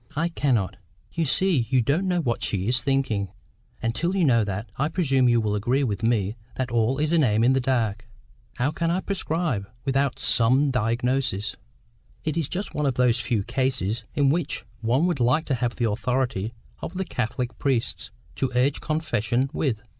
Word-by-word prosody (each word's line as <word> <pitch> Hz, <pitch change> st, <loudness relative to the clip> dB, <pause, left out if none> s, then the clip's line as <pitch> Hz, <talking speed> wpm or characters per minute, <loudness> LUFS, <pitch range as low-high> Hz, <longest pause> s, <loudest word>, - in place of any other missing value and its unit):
"I 165 Hz, +3 st, +1 dB
cannot. 125 Hz, -, 0 dB, 0.4 s
You 165 Hz, -, 0 dB
see 155 Hz, -5 st, +2 dB
you 130 Hz, -2 st, +3 dB
don't 160 Hz, +10 st, +1 dB
know 180 Hz, -1 st, +1 dB
what 120 Hz, -5 st, -1 dB
she 100 Hz, -2 st, -1 dB
is 125 Hz, +1 st, +3 dB
THINKING; 135 Hz, -8 st, 0 dB, 0.5 s
and 115 Hz, 0 st, 0 dB
till 170 Hz, +8 st, -1 dB
you 185 Hz, -4 st, +3 dB
know 115 Hz, -5 st, +4 dB
that, 100 Hz, +2 st, -4 dB
I 145 Hz, +3 st, 0 dB
presume 135 Hz, -7 st, +2 dB
you 120 Hz, -1 st, +4 dB
will 105 Hz, -2 st, 0 dB
agree 120 Hz, +7 st, +1 dB
with 110 Hz, -4 st, -2 dB
me 110 Hz, -2 st, +1 dB, 0.2 s
that 130 Hz, -1 st, -2 dB
all 120 Hz, +3 st, +2 dB
is 155 Hz, +2 st, 0 dB
an 165 Hz, -3 st, +4 dB
aim 110 Hz, -2 st, +3 dB
in 125 Hz, +2 st, +5 dB
the 135 Hz, -, +2 dB
dark. 115 Hz, -4 st, -1 dB, 0.5 s
How 130 Hz, +4 st, 0 dB
can 165 Hz, +1 st, -1 dB
I 180 Hz, +2 st, +1 dB
prescribe, 160 Hz, -, -2 dB, 0.2 s
without 135 Hz, 0 st, +1 dB
SOME 130 Hz, +5 st, +3 dB
diagnosis? 120 Hz, -3 st, 0 dB, 0.7 s
It 155 Hz, -, -1 dB
is 165 Hz, -5 st, -1 dB
just 190 Hz, +3 st, -4 dB
one 150 Hz, -1 st, 0 dB
of 135 Hz, -, 0 dB
those 125 Hz, -2 st, +3 dB
few 110 Hz, -4 st, 0 dB
cases 120 Hz, -3 st, -1 dB
in 140 Hz, -2 st, +3 dB
which 160 Hz, -1 st, -1 dB
one 125 Hz, +8 st, +2 dB
would 175 Hz, -6 st, 0 dB
like 125 Hz, +6 st, +2 dB
to 140 Hz, -, -1 dB
have 120 Hz, -1 st, 0 dB
the 115 Hz, -3 st, 0 dB
authority 120 Hz, -2 st, -1 dB, 0.3 s
of 175 Hz, -, -6 dB
the 190 Hz, +1 st, -2 dB
Catholic 125 Hz, -3 st, -3 dB
priests 130 Hz, -5 st, -1 dB, 0.3 s
to 135 Hz, -2 st, 0 dB
urge 130 Hz, +3 st, +2 dB
confession 130 Hz, -4 st, 0 dB
with. 115 Hz, -8 st, -1 dB
125 Hz, 190 wpm, -25 LUFS, 115-145 Hz, 0.7 s, in